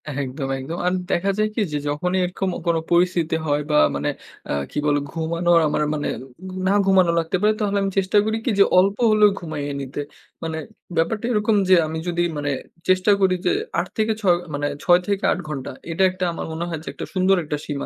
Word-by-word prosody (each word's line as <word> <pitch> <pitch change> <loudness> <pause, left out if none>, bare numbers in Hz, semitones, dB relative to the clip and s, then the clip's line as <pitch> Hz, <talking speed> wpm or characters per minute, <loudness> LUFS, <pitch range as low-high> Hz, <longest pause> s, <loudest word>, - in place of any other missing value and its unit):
একদম, 135 0 -4
একদম। 155 +6 -5
আর 180 - +2 0.2
দেখা 195 +3 +1
যায় 215 0 +2
কি - - 0
যে, 150 - -1
যখনই 180 +6 -1
এরকম 185 +2 -2 0.2
কোন 170 - +3 0.2
পরিস্থিতি 170 -2 +2
হয় 145 0 +1
বা, 150 - +4 0.2
মানে 70 +1 -1 0.4
আ - - +1 0.2
কি - - -7
বলে? 145 -1 +3
ঘুমানো 165 +1 -2 0.2
আমার 150 - 0
মানে 150 -1 -2 0.6
না 195 - +3
ঘুমানো 190 -3 +4
লাগতে 165 +3 -1
পারে। 210 +1 +4
তাহলে 205 -2 0
আমি 195 - -1
চেষ্টা 195 +1 +2
করি 220 +1 0
কি 250 - +2
যে - - +9 0.2
অল্প 195 +2 +2
হলেও 210 -1 +6
ঘুমাইয়ে 150 -4 -4
নিতে। 135 +2 -5 0.4
মানে 160 -1 -3 0.4
ব্যাপারটা 205 +7 0
এরকম 210 -1 +2
যে 185 - +8
আমি 160 +1 -4
যদি 175 0 0
মানে 145 -1 -1 0.4
চেষ্টা 185 +2 +4
করি 185 -1 +4
যে - - +3 0.3
৮-৬ 215 -5 +1 0.2
মানে 145 0 -1 0.2
৬-৮ 180 +2 +2
ঘন্টা, 135 -4 -5 0.2
এটা 165 +4 +1
একটা 185 0 -3
আমার - - -5
মনে 165 +2 -3
হয় 165 -2 -4
যে - - -18
একটা - - -6
সুন্দর 190 0 +3
একটা 150 -1 -3
সীমা 140 -2 -4
175 Hz, 195 wpm, -22 LUFS, 150-195 Hz, 0.6 s, যে